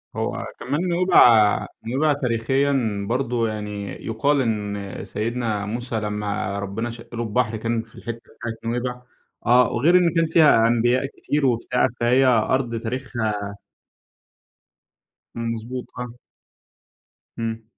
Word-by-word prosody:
هو - - -2
كمان 150 +8 -1
نُوَيْبع 125 - +5 0.2
نُوَيْبع 145 +6 +2
تاريخيًا 125 -4 0
برضه 120 -2 0
يعني 105 -2 -5 0.2
يُقال 135 +6 +1
إن 105 -4 -3
سيدنا 110 -2 -2
موسى 115 +1 -3
لمّا 105 -1 -2
ربنا 100 +4 -3
شق 115 0 -10
له 120 - -2
البحر، 115 0 0
كان 115 +1 -1
في 115 - -20
الحتة 115 +1 -6 0.2
بتاعة 115 -1 -4 0.2
نُوَيْبع 125 +1 -3 0.4
آه، 125 0 +5
وغير 155 +10 +4
إن 175 -2 +3
كان 165 - +3
فيها 155 -8 +5
أنبياء 120 +3 +2
كتير 145 +1 -2
وبتاع، 125 +1 +2
فهي 125 +3 +4
أرض 120 0 +2
تاريخها 110 -4 -3 1.8
إمم، 115 0 -2
مضبوط، 120 +3 -6
آه. 125 -1 -5 1.3
إمم. 115 0 -3
115 Hz, 120 wpm, -23 LUFS, 110-130 Hz, 1.8 s, نُوَيْبع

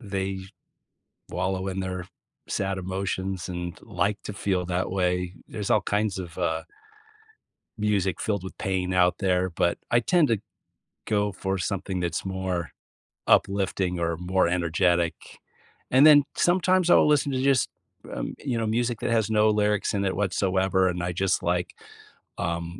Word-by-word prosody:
they 95 -3 -3 0.9
wallow 95 0 -2
in 95 0 -3
their 90 -1 -4 0.4
sad 95 -1 -1
emotions 95 0 -3
and 90 -1 -5
like 100 0 -1
to - - -5
feel 95 -2 -1
that 90 +1 -1
way. 90 -1 0
There's 105 -3 -5
all 105 - +4
kinds 105 -1 0
of, 85 -2 -7
uh 80 -2 0 1.2
music 100 -4 0
filled 100 -4 -1
with 95 - -8
pain 95 -1 -1
out 90 -1 +3
there, 95 -1 +1
but 85 +1 0
I 120 - +4
tend 165 +4 +3
to 115 -4 +1 0.7
go 105 -1 +1
for 95 +1 -2
something 95 0 -2
that's 85 -1 -2
more 95 -3 -3 0.6
uplifting 95 -2 +2
or 85 -1 -1
more 90 +1 +1
energetic. 85 0 +2 0.8
And 130 +3 +6
then 150 -2 +8
sometimes 185 0 +3
I'll - - +6
listen 145 -1 +3
to 130 - 0
just, 135 -1 +3 0.4
um, - - -4
you 130 -5 -2
know, 115 - 0
music 120 +1 0
that - - -1
has 110 -2 +2
no 110 0 +4
lyrics 105 -1 +1
in 100 -1 0
it 95 - 0
whatsoever, 95 -1 +1
and 90 -1 -2
I 90 - -1
just, 95 +2 0
like, 90 0 -1 0.6
um, 85 +1 -3
95 Hz, 155 wpm, -26 LUFS, 90-105 Hz, 1.2 s, then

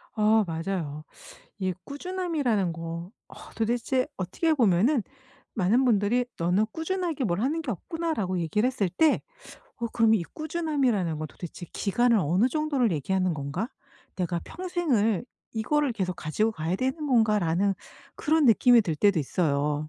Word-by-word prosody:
아 215 0 +4
맞아요. 160 -3 -3 0.5
이 190 -2 -1
꾸준함이라는 290 - -1
거. 165 +1 -6 0.2
어 - - -13 0.2
도대체 240 +3 0
어떻게 195 - 0
보면은 230 - +3 0.5
많은 225 +5 +3
분들이 230 +1 +2
"너는 180 +5 +2
꾸준하게 330 -3 -2
뭘 180 -2 0
하는 295 +7 0
게 275 - -4
없구나."라고 225 - -2
얘기를 210 +8 +1
했을 255 -7 0
때 310 - +3 0.6
어 235 - -3
그럼 225 -1 +3
'이 205 - +1
꾸준함이라는 275 - -1
건 155 - -3
도대체 175 0 -9
기간을 235 +3 +2
어느 185 - +2
정도를 285 - +1
얘기하는 180 +3 0
건가? 145 - -3 0.5
내가 175 -2 -1
평생을 285 - 0 0.3
이거를 275 +5 +1
계속 185 -5 -2
가지고 210 +9 -1
가야 165 0 -2
되는 265 +6 -2
건가?'라는 205 - +2 0.4
그런 315 0 +2
느낌이 240 0 +6
들 165 -6 -2
때도 200 +2 +3
있어요. 150 0 0
215 Hz, 325 characters per minute, -27 LUFS, 175-265 Hz, 0.6 s, 느낌이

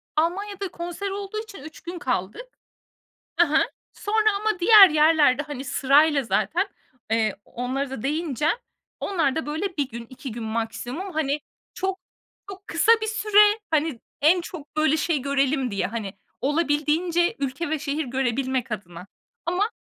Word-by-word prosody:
Almanya'da 390 +5 -1
konser 350 +3 -5
olduğu 400 +2 -4
için 410 -9 -12
3 310 0 -11
gün 345 0 -7
kaldık. 245 - -2 0.9
Hı - - +7
hı. - - +3 0.3
Sonra 435 +1 +1
ama 430 -4 0
diğer 395 0 +9
yerlerde, 300 -3 +4
hani, 285 -3 -7
sırayla 280 +2 +3
zaten, 275 - 0 0.4
eee 220 -2 +1
-onlara 260 +3 -3
da 250 -5 -6
değineceğim 305 - 0 0.4
onlar 325 -9 0
da 320 - -2
böyle 320 +4 -3
1 280 -3 0
gün, 235 0 -7
2 260 -1 -8
gün 230 0 -6
maksimum, 235 - -4
hani, 300 -1 0 0.3
çok 380 0 -2 0.5
çok 390 0 -10
kısa 340 +7 +3
bir 440 - -2
süre, 420 -1 +4
hani, 310 -5 0 0.2
en 345 +4 +5
çok 315 -4 -10
böyle 310 0 +3
şey 320 -1 0
görelim 275 -2 0
diye, 190 -2 -1
hani, 215 -3 -5 0.3
olabildiğince 315 +4 +1
ülke 280 +4 -3
ve 315 -1 -1
şehir 295 +1 -2
görebilmek 260 0 -1
adına. 180 -3 -7 0.4
Ama 375 +6 0
300 Hz, 150 wpm, -24 LUFS, 260-360 Hz, 0.9 s, diğer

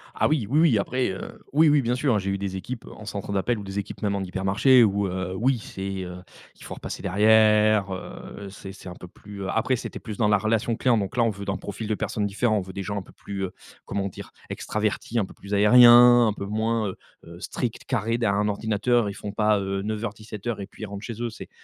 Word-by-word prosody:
Ah - - +2
oui. 140 -9 0
Oui, 150 +3 +3
oui, 155 -10 +5
après, 125 +4 0
heu, 95 - -7
oui, 155 +1 +6
oui, 145 -1 +4
bien 120 +1 0
sûr, 130 -1 +1
hein, - - +2
j'ai 95 +1 -3
eu 100 - -1
des 95 -1 -4
équipes 120 +5 -6
en 110 - -11
centre 100 0 -5
d'appel 105 +4 0
ou - - -7
des 100 +1 -4
équipes 100 0 -7
même 100 -1 0
en 100 - -2
hypermarché 100 +7 +4
où 100 -1 +2
heu, 95 0 -3
oui, 125 +3 +1
c'est, 95 -2 -5
heu, 90 0 -8 0.4
il - - -13
faut - - -7
repasser - - -7
derrière, 105 0 +4
heu, 100 +1 -8
c'est 95 0 -9
c'est 95 - -10
un 90 - -9
peu 90 - -11
plus, 100 +2 -10
heu, 95 - -4
après 125 +3 +1
c'était - - -6
plus 110 -4 -7
dans 110 - +2
la 105 -1 +4
relation 110 +2 0
client, 120 -2 +2
donc 100 +4 -3
là, 120 - +4
on 115 - +3
veut 100 -1 -6
dans 95 - -1
le - - -5
profil 105 +2 -6
de 110 - 0
personnes 105 0 -2
différents, 110 +2 +1
on - - 0
veut 95 0 -9
des 100 - -4
gens 105 +1 -3
un - - -2
peu - - -15
plus, 100 -1 -6
heu, 90 - -7 0.3
comment 100 -1 -2
dire, 95 - -10 0.2
extravertis, 110 +2 -2
un 100 - +1
peu - - -14
plus 100 +1 -9
aériens, 120 +3 +8
un 105 - +1
peu 100 - -6
moins, 110 +1 0
heu 95 - -7 0.3
heu, 85 +1 -11
stricts, 120 +5 -4
carrés 115 -2 0
derrière 105 -4 +1
un 105 - +1
ordinateur. 110 +2 +1
Ils - - -5
font 100 +1 -6
pas, 105 -1 +2
heu, 95 0 -2
09:00-17:00 110 0 -4
et 95 - -6
puis - - -12
ils - - -2
rentrent 100 +1 -8
chez 115 +2 -6
eux. 120 - -1
C'est 110 - -10
105 Hz, 260 wpm, -25 LUFS, 100-115 Hz, 0.4 s, aériens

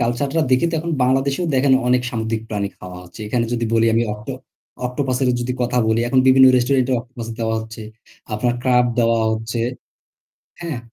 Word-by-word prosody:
culture 120 +4 0
টা - - +4
দেখে 130 +7 +3
তো - - -3
এখন 170 +1 -3
বাংলাদেশেও 135 +6 +1
দেখেন 135 +1 +3 0.2
অনেক 125 0 +3
সামুদ্রিক 110 -2 -3
প্রাণী 100 -2 -2
খাওয়া 90 -1 -9
হচ্ছে। 90 +5 -14
এখানে 115 +1 0
যদি 120 -1 -1
বলি 115 0 +3
আমি 115 - +3
অক্টো 105 +6 -7 0.5
অক্টোপাসেরও 125 0 0
যদি 120 +1 -2
কথা 125 0 0
বলি, 110 +1 +2
এখন 130 +1 +2
বিভিন্ন 130 0 +7
restaurant 125 +1 +2
এ - - +2
অক্টোপাস 120 -1 -9
দেওয়া 110 -1 -1
হচ্ছে, 110 0 -9 0.5
আপনার 120 +3 0
crab 125 -1 +3
দেওয়া 115 -1 +3
হচ্ছে 110 +1 -3 1.0
হ্যাঁ? 165 -7 -4
120 Hz, 180 wpm, -20 LUFS, 115-130 Hz, 1.0 s, বিভিন্ন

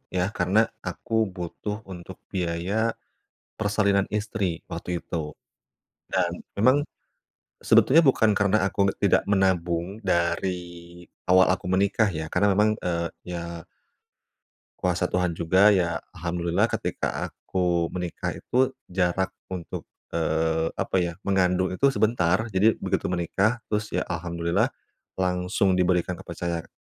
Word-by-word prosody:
ya, 90 - +2 0.2
karena 95 +4 +3 0.3
aku - - -6 0.2
butuh 90 +4 -4 0.2
untuk 85 -1 -9 0.2
biaya 85 +1 -2 0.9
persalinan 100 -2 +2
istri 100 -6 -2
waktu - - -5
itu. 85 - -5 1.0
Dan 90 -2 +1 0.2
memang 130 +7 +5 0.9
sebetulnya 160 +6 +6
bukan 120 -5 +4
karena 100 +1 +3
aku 90 - -9
nggak - - -6
tidak 100 - +4
menabung 90 -3 +1 0.2
dari 85 0 +1 0.8
awal 95 0 +6
aku 95 - -5
menikah 100 +3 +3
ya, 80 -1 -4
karena 105 - +3
memang, 105 +2 +4
eee, 85 -1 0 0.2
ya 85 - -3 1.4
kuasa 90 -1 +1
Tuhan 90 -1 0
juga 95 +5 +5
ya, 85 -4 +1 0.2
alhamdulillah 85 0 0
ketika - - -2
aku 90 -2 -1
menikah 90 -1 -3
itu 130 +1 +1 0.2
jarak 95 +1 +1 0.2
untuk, 90 -3 -6 0.3
eee, 80 0 +1
apa - - -1
ya, 85 -1 -1
mengandung 95 -1 +2
itu 140 +9 +2
sebentar. 105 -2 +2
Jadi 105 +4 +4
begitu 95 0 0
menikah 100 +6 0
terus 105 0 -1
ya - - +1
alhamdulillah 85 -1 0 0.5
langsung 90 +1 +1
diberikan 90 0 +1
kepercaya 85 -1 -4
90 Hz, 120 wpm, -25 LUFS, 85-100 Hz, 1.4 s, sebetulnya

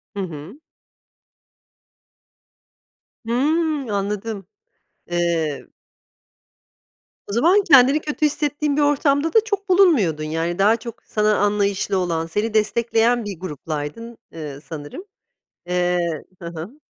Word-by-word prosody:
Hı - - -4
hı. 170 - -8 2.7
Hımm. 290 +3 0
Anladım. 200 0 -3 0.6
Eee 170 -4 -1 1.6
O 200 - -6
zaman 345 - +4
kendini 275 -3 +6
kötü 305 0 -1
hissettiğin 295 0 0
bir 300 - +3
ortamda 290 +1 +2
da 450 - +7
çok 405 -2 -3
bulunmuyordun, 285 - +4
yani, 165 +3 -2
daha 210 +3 +5
çok 235 0 -10
sana 210 0 +1
anlayışlı 205 -1 +1
olan, 170 -3 -1
seni 210 +7 -2
destekleyen 230 +2 +2
bir 200 -5 -6
gruplaydın, 165 - -6
eee, 150 -4 -7
sanırım. 155 - -8 0.6
Eee 175 -2 0 0.2
Hı 170 - -6
hı. 170 - -8
210 Hz, 105 wpm, -21 LUFS, 170-280 Hz, 2.7 s, da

